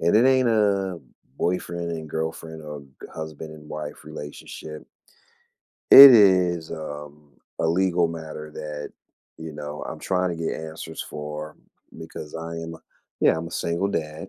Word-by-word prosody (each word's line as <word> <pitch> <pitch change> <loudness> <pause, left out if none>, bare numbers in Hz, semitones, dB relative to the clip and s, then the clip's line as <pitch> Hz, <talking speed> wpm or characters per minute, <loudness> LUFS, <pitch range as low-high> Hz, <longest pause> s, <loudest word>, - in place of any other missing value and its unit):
and 85 +5 +3
it 115 - +5
ain't 130 -2 +4
a 100 -5 +1 0.4
boyfriend 85 -1 -2
and 80 -1 -6
girlfriend 80 0 -4
or 75 -1 -7
g 70 - -17 0.3
husband 80 0 -7
and 75 -1 -13
wife 75 -1 -7
relationship. 75 +1 -9 1.0
It 140 -1 +13
is, 90 -6 +4
um, 75 -2 -8 0.3
a - - +1
legal 90 0 +2
matter 80 -2 -7
that, 75 -1 -6 0.5
you 80 -1 -7
know, 75 0 -7
I'm - - -6
trying 90 -1 0
to 85 - -4
get 80 0 -2
answers 80 0 -7
for 75 +1 -7 0.4
because 80 -2 -9
I 80 0 -5
am 80 0 -6
a - - -12 0.4
yeah, - - +5
I'm 85 +1 -4
a - - -16
single 85 +4 -1
dad. 80 -1 -4
80 Hz, 155 wpm, -24 LUFS, 75-90 Hz, 1.0 s, It